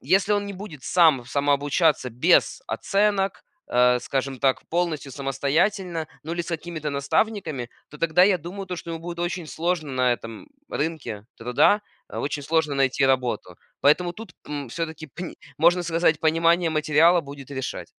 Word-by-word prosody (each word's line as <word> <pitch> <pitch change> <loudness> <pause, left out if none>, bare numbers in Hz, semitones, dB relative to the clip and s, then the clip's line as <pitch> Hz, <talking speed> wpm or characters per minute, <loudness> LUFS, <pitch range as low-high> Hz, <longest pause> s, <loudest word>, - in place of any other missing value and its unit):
Если 190 +8 +2
он, 205 0 +1
не 200 - -5
будет 180 -9 -9
сам 160 -8 +4
самообучаться 145 +1 +1
без 155 +10 +3
оценок, 200 -1 0 0.3
э, 125 0 +4
скажем 135 0 -2
так, 135 -2 +2
полностью 165 -5 -1
самостоятельно, 160 +6 0 0.2
ну, 160 +2 -5
или 175 0 -2
с 165 - -10
какими-то 160 -2 -4
наставниками, 140 - -1 0.2
то 150 - -11
тогда 165 +1 +3
я 200 -2 +4
думаю, 190 +4 -7
то, 180 -1 -4
что 165 - -7
ему 165 - -4
будет 170 0 -7
очень 175 -1 -3
сложно 160 -2 -2
на 125 -1 +2
этом 115 - -7 0.2
рынке 140 -10 -3
труда, 125 - +3 0.3
э, - - -6
очень 145 0 -3
сложно 155 0 +1
найти 135 0 +2
работу. 125 -9 0 0.2
Поэтому 175 +5 +3
тут, 215 -3 -11
м, 145 -3 -5
всё-таки, 160 +2 -5
пни 175 +6 -8 0.2
можно 175 +3 +4
сказать, 165 -2 +1
понимание 165 +2 +3
материала 155 +3 +4
будет 140 -1 -10
решать. 130 -2 -4
160 Hz, 160 wpm, -24 LUFS, 140-175 Hz, 0.3 s, сам